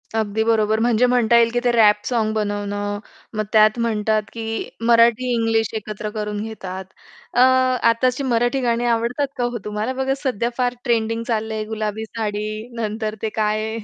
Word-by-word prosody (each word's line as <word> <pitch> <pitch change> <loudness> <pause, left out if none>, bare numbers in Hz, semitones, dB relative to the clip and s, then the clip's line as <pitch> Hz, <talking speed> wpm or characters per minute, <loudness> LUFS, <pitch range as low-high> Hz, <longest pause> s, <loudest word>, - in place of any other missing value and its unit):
अगदी 220 0 0
बरोबर. 220 -1 +2
म्हणजे 235 +1 +3
म्हणता 245 -2 +3
येईल, 230 0 +5
की 245 - +2
ते 245 - +3
रॅप 210 -3 +4
साँग 225 -3 0
बनवणं 205 -1 -2 0.4
मग 215 - +1
त्यात 215 +1 +5
म्हणतात, 215 -2 +1
की 225 -1 -4 0.2
मराठी 235 +1 +4
इंग्लिश 225 -1 +1
एकत्र 215 0 -5
करून 210 -1 -3
घेतात. 190 -4 -6 0.5
अ, - - +1 0.5
आत्ताची 250 +3 +1
मराठी 245 +1 +1
गाणी 240 -1 0
आवडतात 235 +4 0
का 245 - -1
हो 240 0 -1
तुम्हाला? 210 +4 -2
बघा 265 +1 0
सध्या 240 -3 0
फार 250 -1 +1
ट्रेंडिंग 230 -2 0
चाललंय, 220 -1 -1
गुलाबी 215 0 -3
साडी 210 -2 -3 0.3
नंतर 215 0 -3
ते 220 - -1
काय 215 0 0
आहे? 220 +1 -4
225 Hz, 165 wpm, -21 LUFS, 215-235 Hz, 0.5 s, येईल